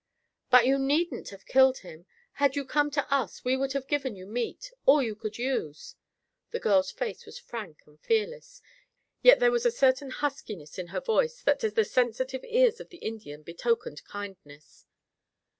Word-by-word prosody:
"But 250 -2 +7
you 270 +2 +3
needn't 295 +6 0
have 195 -1 -13
killed 265 0 +4
him. 170 0 -12 0.2
Had 280 -1 +1
you 285 -1 -2
come 295 +2 +1
to 285 -1 -1
us 255 -8 -1
we 255 +1 +2
would 270 0 -1
have 275 -1 -2
given 275 -6 -1
you 185 -1 -11
meat, 245 - -4 0.2
all 275 +1 +7
you 225 -3 -2
could 215 0 -6
use." 235 - -3 0.6
The 475 - -3
girl's 285 - +3
face 465 - -5
was - - -10
frank 220 - -8
and 150 0 -23
fearless, 485 +3 -2 0.6
yet - - +8
there - - +4
was 480 -1 0
a - - +5
certain 270 - +2
huskiness 215 - -5
in 180 - -5
her - - -4
voice 485 +1 0
that - - +3
to 445 -3 0
the 445 0 +2
sensitive 255 - -1
ears 485 -1 +3
of - - -10
the 350 - -14
Indian 210 - -7
betokened 170 -1 -2
kindness. 190 -8 -11
265 Hz, 180 wpm, -28 LUFS, 215-350 Hz, 0.6 s, yet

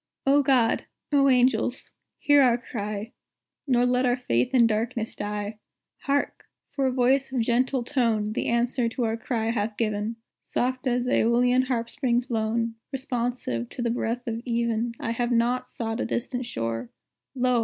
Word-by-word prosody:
O 280 +1 +5
God! 255 -5 +2 0.3
O 275 -1 +4
Angels! 255 0 +2 0.2
hear 290 -1 +5
our 245 -3 +4
cry, 210 -2 -5 0.6
Nor 245 -2 +3
let 250 +1 +2
our 245 0 +2
faith 125 - 0
in 245 -3 +5
darkness 225 +1 -1
die! 210 +1 -4 0.5
Hark! 280 0 -1 0.2
for 275 -2 0
a - - +1
voice 260 +2 +2
of 255 -2 0
gentle 250 +2 +1
tone 230 -5 0
The - - -2
answer 235 0 +1
to 240 +2 -3
our 225 -1 0
cry 225 -1 -1
hath 210 -1 -2
given, 215 0 -1 0.2
Soft 255 +1 -2
as 245 0 +1
Æolian 250 +1 +3
harpstrings 240 0 0
blown, 230 0 0 0.2
Responsive 245 - -2
to 245 - -5
the 235 - +1
breath 240 +1 -2
of 230 0 -3
even 235 -1 -1
"I 230 - -2
have 240 +1 -1
not 245 +2 +1
sought 225 0 -4
a - - -1
distant 245 0 -3
shore; 115 - -3 0.5
Lo! 250 -1 +2
240 Hz, 160 wpm, -26 LUFS, 225-255 Hz, 0.6 s, O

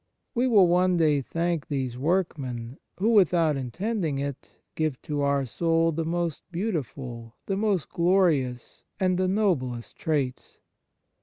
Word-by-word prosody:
We 245 +1 +2
will 205 -7 +6
one 180 +1 +3
day 150 -4 +3
thank 165 +2 -2
these 130 -4 -2
workmen, 135 -6 -2 0.2
who, 210 +4 +1
without 175 -7 +4
intending 160 - -2
it, 140 -1 -5 0.2
give 155 -5 -1
to 145 -1 -2
our 140 -1 +1
soul 165 +5 +1
the 165 +1 -2
most 170 -1 -2
beautiful, 135 - -4
the 195 - -1
most 200 -5 0
glorious, 170 -9 +1 0.2
and 185 -2 +1
the 185 - +2
noblest 160 - -1
traits. 145 -9 -2
165 Hz, 135 wpm, -26 LUFS, 135-185 Hz, 0.2 s, will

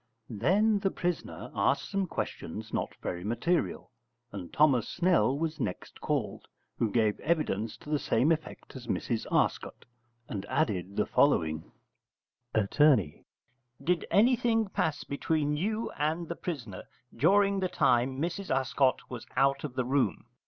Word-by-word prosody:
Then 205 - +2
the 195 - +1
prisoner 175 -2 -4
asked - - +1
some 195 -2 0
questions 110 - -5
not - - -2
very 85 0 -3
material, 120 - -1 0.4
and 95 -4 -7
Thomas 140 -7 +3
Snell 170 -6 +2
was 160 0 -2
next 90 - -5
called, - - -2 0.3
who 115 - +2
gave 110 -1 +1
evidence 115 -10 -1
to - - -13
the 150 - +2
same 130 +6 +2
effect 160 -3 -4
as 125 -2 -9
Mrs 115 -3 -2
Arscott, - - 0 0.4
and 100 -3 -4
added 100 - -1
the 105 - +1
following: 80 - +1 0.8
Att. 105 -3 +1 1.1
Did 175 +3 0
anything 225 -1 +3
pass 160 -5 -1
between 150 +1 -1
you 215 +8 -2
and 160 +3 -1
the 170 - -3
prisoner 120 - -6 0.3
during 195 +8 +4
the 185 -1 0
time 130 -1 +2
Mrs 175 +5 -3
Arscott 130 0 +1
was 120 -3 -8
out 135 0 +3
of 140 -4 -5
the 130 -1 0
room? 135 -3 0
145 Hz, 140 wpm, -29 LUFS, 115-175 Hz, 1.1 s, during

